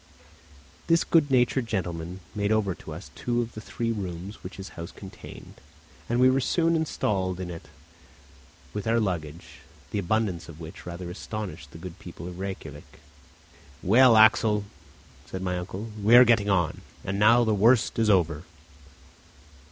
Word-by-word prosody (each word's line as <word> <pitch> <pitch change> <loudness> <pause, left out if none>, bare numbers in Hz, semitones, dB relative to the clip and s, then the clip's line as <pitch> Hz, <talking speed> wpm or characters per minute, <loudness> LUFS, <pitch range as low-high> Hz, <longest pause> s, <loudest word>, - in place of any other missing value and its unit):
This 165 0 +4
good 160 -4 +3
natured 125 -1 +2
gentleman 90 -3 -4
made 105 0 -1
over 105 -4 +2
to - - -11
us - - -9
two 120 -1 -2
of 120 -1 -3
the 110 - -8
three 115 +2 -3
rooms 95 -1 -6
which 90 - -8
his 95 0 -7
house 85 +2 -8
contained, 95 -2 -12 0.5
and 120 +1 +1
we 130 - +6
were 130 +1 +3
soon 165 +4 +2
installed 95 - -1
in 90 -1 -5
it 80 - -9 1.1
with 105 +1 -4
all 115 - +2
our 115 - +3
luggage, 85 -6 -4 0.3
the 105 - -1
abundance 95 -4 -1
of 80 -1 -11
which 80 +2 -10
rather 90 0 -6
astonished 90 -7 -6
the 75 - -12
good 90 +2 -9
people 85 -1 -9
of 90 0 -8
Rejkiavik. 85 -7 -7 0.9
"Well, 115 +4 +6
Axel," 110 -1 +5 0.6
said 95 0 -6
my 90 -1 -1
uncle, 95 +5 -6
"we 110 +4 +6
are 125 +1 +10
getting 110 -3 +3
on, 90 -5 +1 0.2
and 100 +1 -2
now 115 +3 +6
the 110 -2 +2
worst 115 +4 +3
is 110 -1 +3
over." 85 -6 +2
100 Hz, 165 wpm, -26 LUFS, 90-115 Hz, 1.1 s, are